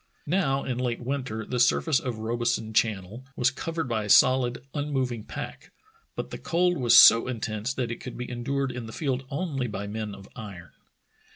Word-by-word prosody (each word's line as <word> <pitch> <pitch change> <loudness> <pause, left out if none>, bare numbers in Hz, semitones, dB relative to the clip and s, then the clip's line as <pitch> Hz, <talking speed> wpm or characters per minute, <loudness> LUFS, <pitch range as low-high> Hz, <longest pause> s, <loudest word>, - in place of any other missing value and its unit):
Now 145 -5 +1
in 125 -2 -3
late 125 -2 -1
winter 125 -4 -3
the 125 - -3
surface 135 +4 +3
of 125 -3 -4
Robeson 115 0 -1
Channel 110 +1 0
was 125 +1 +2
covered 165 +3 -4
by 110 -3 -1
a - - -7
soHd, 125 +2 +5 0.2
unmoving 130 -6 -2
pack, - - -8 0.4
but - - -5
the - - -6
cold 175 -1 +1
was 120 -3 +6
so 115 +2 +9
intense 110 -1 -3
that 120 -3 -2
it 115 - -5
could 125 - -8
be 125 - -5
endured 135 +2 -2
in 120 -2 -6
the 110 - -9
field 135 -3 -2
only 140 -4 -2
by 105 -2 -5
men 105 0 -5
of 100 0 -13
iron. 100 -7 -9
125 Hz, 185 wpm, -26 LUFS, 110-135 Hz, 0.4 s, so